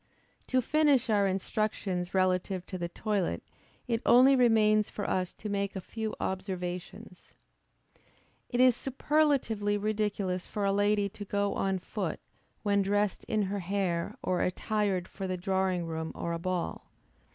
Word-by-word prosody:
To 255 Hz, -1 st, +2 dB
finish 285 Hz, -4 st, +3 dB
our 200 Hz, -2 st, +3 dB
instructions 190 Hz, -2 st, -1 dB
relative 185 Hz, 0 st, +1 dB
to 185 Hz, -, -6 dB
the 170 Hz, 0 st, -3 dB
toilet, 195 Hz, -, -1 dB, 0.4 s
it 230 Hz, -1 st, 0 dB
only 260 Hz, +3 st, +7 dB
remains 215 Hz, -4 st, +4 dB
for 205 Hz, -, -4 dB
us 185 Hz, -1 st, 0 dB
to 215 Hz, -, -7 dB
make 200 Hz, -1 st, -2 dB
a -, -, -2 dB
few 220 Hz, +3 st, -5 dB
observations. 185 Hz, +1 st, -5 dB, 1.1 s
It 245 Hz, -, -1 dB
is 255 Hz, -2 st, +6 dB
superlatively 270 Hz, -7 st, +1 dB
ridiculous 205 Hz, -3 st, -1 dB
for 205 Hz, -1 st, -2 dB
a 195 Hz, -, +2 dB
lady 205 Hz, 0 st, +2 dB
to 205 Hz, -, -8 dB
go 200 Hz, 0 st, 0 dB
on 195 Hz, -1 st, 0 dB
foot, 185 Hz, -2 st, -4 dB, 0.4 s
when 200 Hz, -1 st, +3 dB
dressed 205 Hz, 0 st, 0 dB
in 215 Hz, -1 st, 0 dB
her 200 Hz, +1 st, -2 dB
hair, 190 Hz, +2 st, -1 dB
or 180 Hz, -1 st, 0 dB
attired 195 Hz, -1 st, 0 dB
for 195 Hz, -1 st, -6 dB
the 185 Hz, 0 st, -2 dB
drawing 190 Hz, -1 st, 0 dB
room 160 Hz, -1 st, -4 dB
or 170 Hz, -, -3 dB
a 170 Hz, -, -3 dB
ball. 180 Hz, 0 st, -3 dB
200 Hz, 150 wpm, -30 LUFS, 185-215 Hz, 1.1 s, only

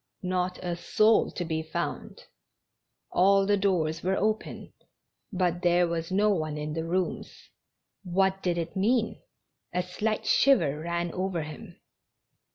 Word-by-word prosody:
Not 180 Hz, 0 st, -1 dB
a 175 Hz, -1 st, -2 dB
soul 215 Hz, +5 st, +3 dB
to 175 Hz, -, -3 dB
be 160 Hz, -1 st, -2 dB
found; 160 Hz, 0 st, -5 dB, 0.9 s
all 195 Hz, +2 st, +4 dB
the 205 Hz, +1 st, +3 dB
doors 180 Hz, -5 st, 0 dB
were 190 Hz, +2 st, 0 dB
open, 215 Hz, +1 st, -2 dB, 0.6 s
but 180 Hz, -2 st, 0 dB
there 175 Hz, 0 st, +3 dB
was 165 Hz, +1 st, -3 dB
no 205 Hz, +2 st, +3 dB
one 155 Hz, -5 st, -2 dB
in 150 Hz, 0 st, -4 dB
the 160 Hz, +1 st, -2 dB
rooms. 180 Hz, +2 st, -3 dB, 0.5 s
What 190 Hz, +1 st, +1 dB
did 175 Hz, -2 st, 0 dB
it 170 Hz, +2 st, -4 dB
mean? 225 Hz, +4 st, +1 dB, 0.5 s
A 180 Hz, -, -1 dB
slight 215 Hz, +4 st, -2 dB
shiver 170 Hz, -, +3 dB
ran 170 Hz, +1 st, -2 dB
over 185 Hz, -2 st, -2 dB
him. 150 Hz, 0 st, -10 dB
180 Hz, 140 wpm, -28 LUFS, 170-195 Hz, 0.9 s, all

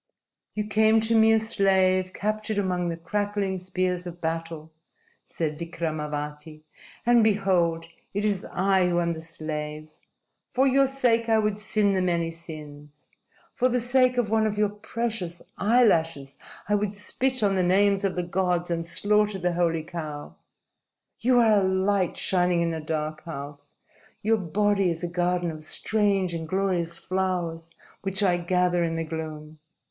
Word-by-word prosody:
"You 210 Hz, -1 st, -1 dB
came 220 Hz, +1 st, +4 dB
to 225 Hz, +1 st, +1 dB
me 220 Hz, 0 st, +6 dB
a 220 Hz, -, +5 dB
slave 190 Hz, -4 st, +2 dB
captured 215 Hz, +1 st, -2 dB
among 180 Hz, -3 st, 0 dB
the 165 Hz, -, -4 dB
crackling 200 Hz, +2 st, -2 dB
spears 180 Hz, -1 st, -2 dB
of 175 Hz, 0 st, -8 dB
battle," 165 Hz, -1 st, -4 dB, 0.6 s
said 155 Hz, -2 st, -3 dB
Vikramavati, 155 Hz, -2 st, -5 dB, 0.4 s
"and 240 Hz, -1 st, +5 dB
behold, 185 Hz, -6 st, +2 dB, 0.3 s
it 205 Hz, +2 st, -2 dB
is 200 Hz, -3 st, +1 dB
I 190 Hz, -1 st, +2 dB
who 175 Hz, 0 st, +1 dB
am 170 Hz, -1 st, 0 dB
the 160 Hz, -, -7 dB
slave. 155 Hz, -1 st, -6 dB, 0.6 s
For 260 Hz, +2 st, +2 dB
your 270 Hz, 0 st, +4 dB
sake 240 Hz, -4 st, +1 dB
I 225 Hz, -, +4 dB
would 210 Hz, -1 st, 0 dB
sin 210 Hz, -1 st, +1 dB
the 190 Hz, -, +1 dB
many 170 Hz, -2 st, 0 dB
sins. 150 Hz, -3 st, -11 dB, 0.4 s
For 255 Hz, 0 st, +2 dB
the 250 Hz, 0 st, +1 dB
sake 250 Hz, +1 st, +2 dB
of 225 Hz, -4 st, 0 dB
one 220 Hz, -1 st, +3 dB
of 210 Hz, -1 st, -3 dB
your 210 Hz, -1 st, +2 dB
precious 210 Hz, -4 st, -4 dB, 0.2 s
eyelashes 165 Hz, -, +2 dB, 0.3 s
I 210 Hz, -, 0 dB
would 205 Hz, 0 st, 0 dB
spit 255 Hz, +4 st, 0 dB
on 200 Hz, -1 st, +3 dB
the 190 Hz, -, +2 dB
names 195 Hz, +2 st, +3 dB
of 195 Hz, -2 st, 0 dB
the 180 Hz, -, -1 dB
gods 175 Hz, 0 st, -1 dB
and 165 Hz, 0 st, -2 dB
slaughter 210 Hz, +3 st, +1 dB
the 180 Hz, -1 st, -1 dB
holy 165 Hz, -2 st, 0 dB
cow. 155 Hz, -3 st, -7 dB, 0.8 s
You 250 Hz, +1 st, +3 dB
are 220 Hz, -3 st, +5 dB
a -, -, 0 dB
light 190 Hz, -1 st, +1 dB
shining 180 Hz, -2 st, +2 dB
in 165 Hz, -1 st, -1 dB
a 160 Hz, -, -4 dB
dark 155 Hz, 0 st, -4 dB
house. 145 Hz, -2 st, -8 dB, 0.5 s
Your 220 Hz, +2 st, +3 dB
body 200 Hz, +1 st, +1 dB
is 165 Hz, 0 st, -4 dB
a -, -, 0 dB
garden 175 Hz, 0 st, 0 dB
of 155 Hz, -1 st, -9 dB
strange 195 Hz, +2 st, 0 dB
and 160 Hz, -1 st, -5 dB
glorious 180 Hz, -3 st, -1 dB
flowers 175 Hz, -3 st, -2 dB, 0.3 s
which 195 Hz, +1 st, 0 dB
I 180 Hz, -3 st, +3 dB
gather 180 Hz, 0 st, +1 dB
in 165 Hz, -1 st, -1 dB
the 165 Hz, -, -1 dB
gloom. 155 Hz, -1 st, -7 dB
185 Hz, 160 wpm, -26 LUFS, 165-210 Hz, 0.8 s, me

